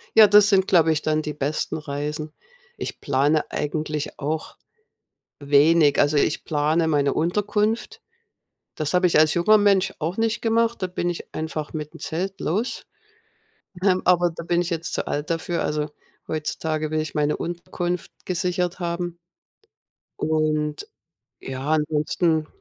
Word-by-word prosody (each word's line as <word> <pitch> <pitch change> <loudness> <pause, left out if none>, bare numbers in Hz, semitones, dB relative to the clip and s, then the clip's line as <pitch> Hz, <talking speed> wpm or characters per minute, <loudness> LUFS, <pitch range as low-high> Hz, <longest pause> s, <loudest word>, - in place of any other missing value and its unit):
Ja, 220 -1 +9
das 205 0 +6
sind, 190 -2 +3
glaube 165 -3 +4
ich, 155 - 0
dann 155 0 +1
die 150 -1 -4
besten 150 +2 -2
Reisen. 150 +1 -4 0.5
Ich - - -5
plane 145 +2 +1
eigentlich 150 0 -3
auch 155 +2 -3 0.8
wenig. 145 +1 +4
Also, 145 +1 +3
ich 150 - +1
plane 155 +2 +1
meine 145 -3 +2
Unterkunft. 210 +6 -1 0.7
Das 155 +1 -3
habe 180 0 +4
ich 170 - +3
als 155 0 +5
junger 215 +5 +5
Mensch 195 -2 +3
auch 165 +4 -3
nicht 225 0 0
gemacht. 230 -1 +1
Da - - +2
bin 175 -1 -2
ich 175 - -7
einfach 155 -1 -4
mit 150 -1 -5
'n - - -10
Zelt 190 +4 -4
los, 210 +10 -2 1.0
ähm, 185 -2 +3
aber 175 -1 +4
da 165 - -6
bin 170 +1 +1
ich 175 - -3
jetzt 165 -1 -3
zu - - -2
alt 145 +1 -3
dafür, 165 +1 -1
also 150 0 -1 0.4
heutzutage 155 0 -2
will 155 0 +1
ich 155 - -6
meine 150 0 +1
Unterkunft 175 +1 -4
gesichert 180 0 -1
haben. 175 0 -3 1.0
Und, 155 -1 0 0.6
ja, 135 +2 -5
ansonsten 155 +1 +1
160 Hz, 150 wpm, -23 LUFS, 150-180 Hz, 1.0 s, Ja